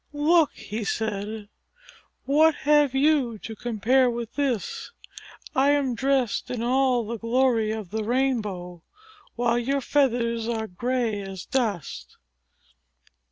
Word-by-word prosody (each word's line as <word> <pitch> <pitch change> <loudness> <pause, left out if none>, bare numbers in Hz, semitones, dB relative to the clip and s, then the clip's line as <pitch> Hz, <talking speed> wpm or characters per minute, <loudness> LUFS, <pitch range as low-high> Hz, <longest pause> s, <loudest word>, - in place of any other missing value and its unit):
"Look," 310 +2 +3
he 215 +2 -6
said. 210 0 -3 0.8
"What 310 +3 +4
have 295 -2 +3
you 270 -5 +2
to 220 +2 -8
compare 245 +3 +2
with 235 -1 -5
this? 270 -7 -2 0.7
I 270 +2 +4
am 275 -3 +1
dressed 265 -2 0
in 240 -2 -3
all 250 -1 +2
the 230 +1 -5
glory 230 -1 +2
of 215 -4 -5
the 220 0 -2
rainbow, 210 -8 -1 0.5
while 240 0 +1
your 275 +4 0
feathers 235 -5 +1
are 225 -2 -2
gray 230 +1 -2
as 195 -2 -7
dust!" 175 - -3
235 Hz, 120 wpm, -25 LUFS, 220-270 Hz, 0.8 s, What